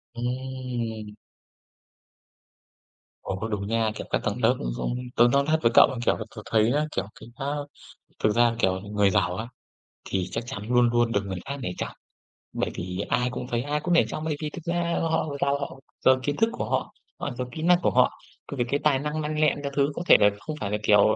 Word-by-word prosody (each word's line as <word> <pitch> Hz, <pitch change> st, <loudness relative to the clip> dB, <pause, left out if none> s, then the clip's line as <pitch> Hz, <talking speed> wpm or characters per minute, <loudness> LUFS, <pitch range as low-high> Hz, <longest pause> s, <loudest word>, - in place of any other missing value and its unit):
Ừm! 120 Hz, -3 st, -4 dB, 2.1 s
Ồ, 95 Hz, -, -3 dB
cũng 110 Hz, -, -2 dB
đúng 100 Hz, -2 st, -2 dB
nha. 115 Hz, 0 st, +1 dB
Kiểu, -, -, -6 dB
các -, -, 0 dB
tầng -, -, -1 dB
lớp -, -, +5 dB
ấy, -, -, -3 dB
cũng 120 Hz, -, -2 dB, 0.2 s
tớ 120 Hz, -, +6 dB
nói 140 Hz, +2 st, +4 dB
thật 160 Hz, +1 st, +3 dB
với 115 Hz, -, +4 dB
cậu -, -, +8 dB
là, 130 Hz, -, -4 dB
kiểu -, -, +3 dB
là, -, -, -4 dB
tớ 105 Hz, -, -6 dB
thấy 110 Hz, +1 st, +4 dB
á, 150 Hz, +2 st, +2 dB
kiểu, -, -, 0 dB
cái, -, -, -12 dB
á, 135 Hz, -, -5 dB, 0.8 s
thực -, -, +5 dB
ra, 120 Hz, -1 st, +4 dB
kiểu, 95 Hz, -3 st, +2 dB
người 105 Hz, 0 st, +2 dB
giàu 90 Hz, -1 st, +1 dB
á, 110 Hz, +3 st, -4 dB, 0.6 s
thì 95 Hz, -1 st, -2 dB
chắc 115 Hz, +1 st, -3 dB
chắn 120 Hz, -5 st, -5 dB
luôn 125 Hz, -1 st, +4 dB
luôn 120 Hz, -1 st, +2 dB
được 100 Hz, -, +2 dB
người 95 Hz, -2 st, -4 dB
khác 140 Hz, +2 st, -3 dB
nể -, -, -2 dB
trọng. -, -, -3 dB, 0.6 s
Bởi -, -, -1 dB
vì 90 Hz, +1 st, -4 dB
ai 125 Hz, 0 st, +2 dB
cũng 125 Hz, -, -5 dB
thấy, 120 Hz, -1 st, +1 dB
ai 150 Hz, +1 st, -1 dB
cũng 175 Hz, -, +1 dB
nể 170 Hz, -, +6 dB
trọng. 155 Hz, -, -5 dB
Bởi 155 Hz, -2 st, 0 dB
vì 150 Hz, -, -2 dB
thực 170 Hz, +1 st, -9 dB
ra 170 Hz, 0 st, 0 dB
họ 160 Hz, -1 st, +1 dB
giàu, 140 Hz, 0 st, +2 dB
họ 140 Hz, -1 st, -6 dB, 0.3 s
giàu 130 Hz, 0 st, +6 dB
kiến 145 Hz, -, 0 dB
thức 225 Hz, +1 st, +3 dB
của -, -, -3 dB
họ, -, -, -1 dB, 0.3 s
họ 145 Hz, -, -3 dB
giàu 125 Hz, 0 st, -3 dB
kỹ 160 Hz, -, -6 dB
năng 175 Hz, +2 st, +5 dB
của -, -, +2 dB
họ, -, -, +4 dB, 0.4 s
cũng 140 Hz, -, -6 dB
vì 120 Hz, -, +2 dB
cái 140 Hz, -, +1 dB
tài 145 Hz, -3 st, +3 dB
năng 150 Hz, +2 st, -2 dB
lanh 150 Hz, 0 st, -2 dB
lẹ 155 Hz, -1 st, +4 dB
các 140 Hz, -, -3 dB
thứ. 140 Hz, 0 st, +2 dB
Có -, -, -3 dB
thể -, -, +8 dB
là 105 Hz, -, +6 dB
không 120 Hz, +8 st, -5 dB
phải 100 Hz, -, -2 dB
là 105 Hz, -, +1 dB
kiểu, 105 Hz, 0 st, +5 dB
125 Hz, 240 wpm, -26 LUFS, 110-145 Hz, 2.1 s, cậu